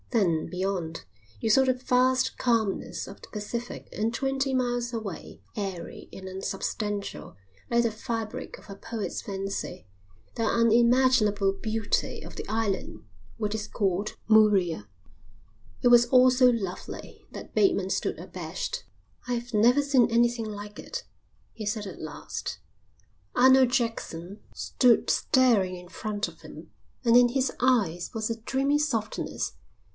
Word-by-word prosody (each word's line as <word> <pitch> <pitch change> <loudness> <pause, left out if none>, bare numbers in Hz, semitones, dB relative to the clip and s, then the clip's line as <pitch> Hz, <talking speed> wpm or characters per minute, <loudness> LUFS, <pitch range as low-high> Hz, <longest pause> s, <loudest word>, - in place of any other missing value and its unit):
Then, 180 -10 +1
beyond, 180 - -3 0.3
you 225 - -1
saw 265 +5 +6
the 260 -1 +3
vast 255 +1 +2
calmness 225 -5 0
of - - -11
the - - -12
Pacific 230 +3 -5
and 220 +2 0
twenty 270 +1 0
miles 245 -1 0
away, 215 -7 -6
airy 195 -5 -5
and 190 0 -9
unsubstantial 200 - -4 0.3
like 235 0 +3
the 230 - +1
fabric 225 0 -5
of - - -17
a 200 - -7
poet's 215 +1 -4
fancy, 195 - -5 0.5
the 230 - -1
unimaginable 230 -3 +4
beauty 220 +1 -2
of - - -10
the - - -6
island 220 -4 -2 0.3
which 210 -1 -2
is 215 -1 -4
called 200 0 -1
Murea. 200 - +4 0.9
It 245 - +4
was 240 0 +7
all 255 +1 +6
so 250 0 +5
lovely 210 -7 -3
that - - -9
Bateman 200 - +2
stood - - -1
abashed. - - -5 0.4
"I've 240 -1 -3
never 240 +6 +5
seen 265 -5 +4
anything 235 0 +2
like 205 0 -7
it," - - -6 0.5
he 220 - -6
said 210 0 -2
at 190 - -8
last. 155 -2 -6 0.8
Arnold 260 0 +6
Jackson 210 -6 -2
stood 245 -3 +3
staring 225 -9 +3
in 180 0 -12
front 210 +3 -3
of - - -14
him, - - -12 0.3
and 230 0 +5
in 245 0 +7
his 265 +1 0
eyes 210 -10 +2
was 220 -1 -2
a 225 0 -4
dreamy 275 +5 +1
softness. 230 -8 -2
225 Hz, 140 wpm, -27 LUFS, 200-250 Hz, 0.9 s, was